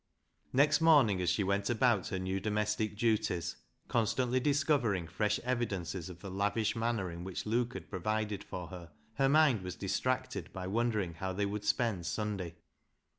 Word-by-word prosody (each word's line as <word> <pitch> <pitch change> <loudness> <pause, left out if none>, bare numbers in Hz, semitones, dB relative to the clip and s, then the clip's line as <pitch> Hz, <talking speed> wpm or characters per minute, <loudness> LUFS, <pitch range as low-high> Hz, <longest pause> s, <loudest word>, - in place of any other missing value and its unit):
" - - -47
Next 145 +5 +4
morning, 140 - +5
as 90 - +1
she 90 +3 +2
went 100 +1 0
about 120 -4 +2
her 95 - -2
new 95 +1 -2
domestic 105 +1 -1
duties, 105 -7 0 0.3
constantly 125 +3 +1
discovering 140 - +1
fresh 105 +5 0
no - - -11
BECKSIDE - - -11
LIGHTS - - +2
evidences 95 -6 -3
of 90 -1 -10
the 95 - -7
lavish 105 +3 0
manner 115 -5 -1
in 85 +1 -7
which 95 -1 -5
Luke 120 +3 0
had 85 -5 -7
provided 105 +2 -2
for 90 -2 -6
her, 90 -2 -9 0.3
her 135 0 +3
mind 145 -7 +5
was 90 -1 -5
distracted 130 +6 -2
by 95 -1 -5
wondering 105 -3 0
how 95 +3 -4
they 100 +2 0
would 105 +1 -3
spend 105 -7 0
Sunday. 100 -4 -3
105 Hz, 180 wpm, -32 LUFS, 95-120 Hz, 0.3 s, morning